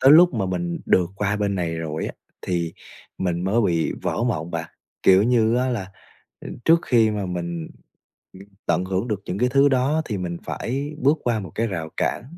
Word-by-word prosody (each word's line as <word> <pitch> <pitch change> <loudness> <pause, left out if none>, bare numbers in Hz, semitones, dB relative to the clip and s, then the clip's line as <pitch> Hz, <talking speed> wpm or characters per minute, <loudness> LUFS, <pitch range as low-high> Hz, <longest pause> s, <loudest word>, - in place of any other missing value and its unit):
tới 135 +2 +7
lúc 170 0 +7
mà 105 -4 0
mình 85 -2 -2
được 90 -1 +3
qua 105 0 0
bên 100 -1 0
này 85 -3 -2
rồi 80 -1 -3
á, - - -5 0.3
thì 85 -2 -1 0.5
mình 90 -1 -1
mới 105 +5 +2
bị 85 -5 +1
vỡ 115 - -1
mộng 85 -9 -1
bạn, 85 0 -4 0.3
kiểu 95 +1 +6
như 115 0 +3
á 130 +1 +1
là, 100 -7 -3 0.7
trước 165 +1 +6
khi 115 -3 +3
mà 105 -2 -2
mình 85 -2 -4 1.0
tận 85 +2 +1
hưởng 95 +4 -1
được 105 -2 -2
những 90 - -3
cái 125 +1 +3
thứ 140 +2 +5
đó 135 +4 +2
thì 105 - -3
mình 85 -2 -4
phải 140 +5 -3
bước 145 +5 +3
qua 120 -3 +1
một 95 -6 -7
cái 115 +1 0
rào 80 -6 -4
cản, - - 0
100 Hz, 200 wpm, -23 LUFS, 85-120 Hz, 1.0 s, tới